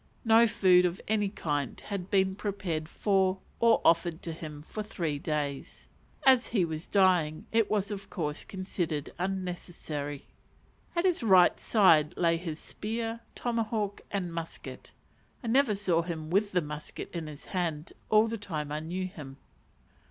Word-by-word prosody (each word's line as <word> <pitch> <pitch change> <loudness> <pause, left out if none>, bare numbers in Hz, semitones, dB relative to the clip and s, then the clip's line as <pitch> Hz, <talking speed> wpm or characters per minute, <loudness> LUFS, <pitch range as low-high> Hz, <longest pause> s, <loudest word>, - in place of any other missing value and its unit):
No 230 +1 +6
food 185 -4 +5
of 180 +1 -1
any 210 -2 +1
kind 145 - -2
had 195 -3 -5
been 190 -1 +3
prepared 185 -6 -3
for 190 -2 +2 0.2
or 230 -1 +5
offered 170 0 +3
to 170 - -3
him 155 -2 -8
for 215 - -6
three 170 -8 -3
days: 145 -2 -4 0.4
as 260 -2 +6
he 200 -7 +2
was 160 +1 -5
dying 180 -6 +3
it 225 -1 +3
was 210 -1 0
of 195 -1 -6
course 150 -5 -3
considered 175 -6 -3
unnecessary. 175 -6 -4 0.7
At 340 +2 +1
his 360 -6 +2
right 190 -6 +5
side 165 -9 +4
lay 170 -1 +3
his 165 -3 -5
spear, 225 +2 -4 0.2
tomahawk, 225 -4 -1
and 180 -4 -3
musket. 165 -1 -7 0.5
(I - - -4
never 255 -3 +4
saw 185 -4 +1
him 165 -2 -5
with 200 +2 +2
the 180 -2 +1
musket 150 0 -7
in 165 -3 -4
his 150 -2 -10
hand 170 -4 -3 0.2
all 215 +1 +5
the 225 0 -4
time 155 -7 -4
I 150 - -1
knew 175 +4 -3
him.) 145 -7 -9
180 Hz, 155 wpm, -29 LUFS, 155-205 Hz, 0.7 s, No